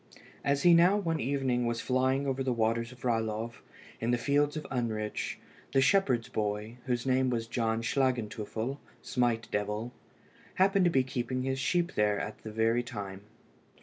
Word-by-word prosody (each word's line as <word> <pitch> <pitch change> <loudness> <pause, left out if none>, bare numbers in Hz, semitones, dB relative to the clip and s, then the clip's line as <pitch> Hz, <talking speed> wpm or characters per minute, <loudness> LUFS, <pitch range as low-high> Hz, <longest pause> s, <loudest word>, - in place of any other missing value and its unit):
As 140 0 +1
he 175 - +7
now, 175 +4 +6
one 165 -5 -1
evening, 130 -2 0
was 120 -1 -1
flying 130 +2 +1
over 135 -1 -1
the 130 -1 0
waters 115 0 0
of 125 -1 -15
Ralov 115 -1 -1 0.4
and 115 +1 +1
the 120 - +3
fields 145 +4 +1
of 155 - -4
Unrich, 110 -4 -2 0.4
the 135 - +4
shepherd's 135 - +3
boy, 105 +2 -3
whose 125 -1 0
name 130 0 +2
was 115 -2 -1
John 115 -1 -1
Schlagenteufel 120 0 -1 0.2
(Smite 120 -2 0
devil), 105 +4 -2 0.6
happened 195 0 +4
to - - +5
be 130 -4 +3
keeping 130 -1 -2
his 135 0 -1
sheep 175 +5 +1
there 105 -1 +2
at 105 - -5
the 110 - -7
very 115 +2 +2
time. 100 -5 -6
120 Hz, 165 wpm, -30 LUFS, 115-135 Hz, 0.6 s, he